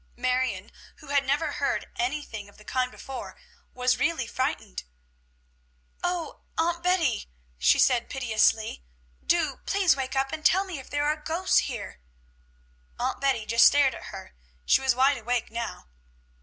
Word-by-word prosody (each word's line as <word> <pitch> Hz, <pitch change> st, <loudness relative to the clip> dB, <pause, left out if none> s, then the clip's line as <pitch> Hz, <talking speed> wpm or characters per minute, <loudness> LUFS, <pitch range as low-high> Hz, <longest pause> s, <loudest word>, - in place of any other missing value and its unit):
Marion, 250 Hz, -5 st, -1 dB, 0.2 s
who 300 Hz, -, -15 dB
had 280 Hz, -1 st, +2 dB
never 295 Hz, +3 st, +1 dB
heard -, -, -1 dB
anything 295 Hz, -, -3 dB
of -, -, -20 dB
the 210 Hz, -, -17 dB
kind 255 Hz, -1 st, 0 dB
before, 270 Hz, 0 st, -8 dB, 0.4 s
was 250 Hz, 0 st, +1 dB
really 320 Hz, -6 st, +1 dB
frightened. 230 Hz, -, -3 dB, 1.2 s
"O 355 Hz, -2 st, -2 dB, 0.2 s
Aunt 340 Hz, +1 st, +1 dB
Betty," 340 Hz, -, +1 dB, 0.3 s
she 60 Hz, -, +5 dB
said 245 Hz, -3 st, +3 dB
piteously, 220 Hz, -, +1 dB, 0.4 s
"do, 315 Hz, -6 st, +1 dB
please, 390 Hz, -6 st, +3 dB
wake 265 Hz, -1 st, -3 dB
up 270 Hz, 0 st, +1 dB
and 310 Hz, -, -5 dB
tell 380 Hz, +5 st, +4 dB
me 360 Hz, -7 st, -6 dB
if 265 Hz, -, -12 dB
there 290 Hz, 0 st, 0 dB
are 300 Hz, +1 st, +1 dB
ghosts 325 Hz, +4 st, +2 dB
here!" 220 Hz, -, -7 dB, 1.0 s
Aunt -, -, -2 dB
Betty 265 Hz, -6 st, +1 dB
just 230 Hz, +2 st, +6 dB
stared 280 Hz, -2 st, +4 dB
at -, -, -9 dB
her; 195 Hz, -2 st, -9 dB, 0.3 s
she -, -, +4 dB
was 265 Hz, -2 st, +2 dB
wide 265 Hz, +1 st, +3 dB
awake 240 Hz, 0 st, -2 dB
now. 235 Hz, 0 st, -5 dB
265 Hz, 155 wpm, -27 LUFS, 235-310 Hz, 1.2 s, just